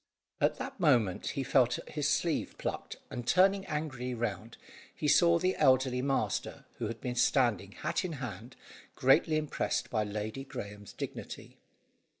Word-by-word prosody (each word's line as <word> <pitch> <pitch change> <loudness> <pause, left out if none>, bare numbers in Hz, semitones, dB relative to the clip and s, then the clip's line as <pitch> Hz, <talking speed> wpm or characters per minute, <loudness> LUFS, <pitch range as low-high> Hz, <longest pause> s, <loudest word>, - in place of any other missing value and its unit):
At - - +2
that - - -6
moment, 105 -7 +2
he 135 - -2
felt 130 -2 +3
his 150 -2 -1
sleeve 165 +1 0
plucked, - - -4 0.2
and 120 -1 -5
turning 195 +1 +4
angrily 135 -5 -3
round, 115 0 -4 0.4
he 150 - -2
saw 170 +3 +5
the 185 +2 +1
elderly 130 -3 +3
master, 135 0 -1
who 115 - -1
had 115 +1 -5
been 125 - -3
standing 120 -6 +2
hat 170 +5 -2
in 180 -3 -3
hand, 125 - -7 0.4
greatly 155 +4 +4
impressed 155 -1 -2
by 110 -3 +1
Lady 105 +4 -4
Graeme's 105 -6 -8
dignity. - - -7
130 Hz, 150 wpm, -31 LUFS, 115-150 Hz, 0.4 s, saw